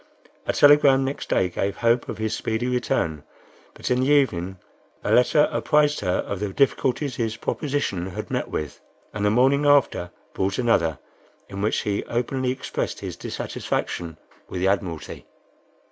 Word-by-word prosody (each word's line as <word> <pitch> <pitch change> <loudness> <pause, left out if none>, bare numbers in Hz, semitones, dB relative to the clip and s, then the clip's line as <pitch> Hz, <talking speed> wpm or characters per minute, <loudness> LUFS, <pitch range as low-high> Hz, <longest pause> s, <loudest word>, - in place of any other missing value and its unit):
A - - +1
telegram 145 -2 +6
next 135 +2 -4
day 90 - +2
gave 95 +3 -2
hope 120 +1 +2
of - - -4
his 110 0 -1
speedy 110 +2 -2
return, 100 -11 -1 0.5
but - - -4
in 125 - +3
the 130 - +1
evening 95 -11 +2 0.5
a - - -1
letter 150 +5 +5
apprised 150 0 +2
her 90 - 0
of 100 - -4
the 105 -1 -2
difficulties 135 +2 +1
his 115 -2 -2
proposition 135 - -2
had 95 - -6
met - - -1
with, 75 -2 -4 0.3
and 105 - -3
the 105 - +4
morning 135 +6 +3
after 140 -11 +3 0.2
brought 95 +1 -1
another, 85 - +2 0.5
in 100 0 -6
which 105 - +1
he 100 -1 -1
openly 125 +2 -1
expressed 130 +1 -3
his - - -5
dissatisfaction 85 -2 -4 0.3
with 90 - -4
the 95 - +2
Admiralty. 95 -5 -3
115 Hz, 160 wpm, -24 LUFS, 95-135 Hz, 0.5 s, telegram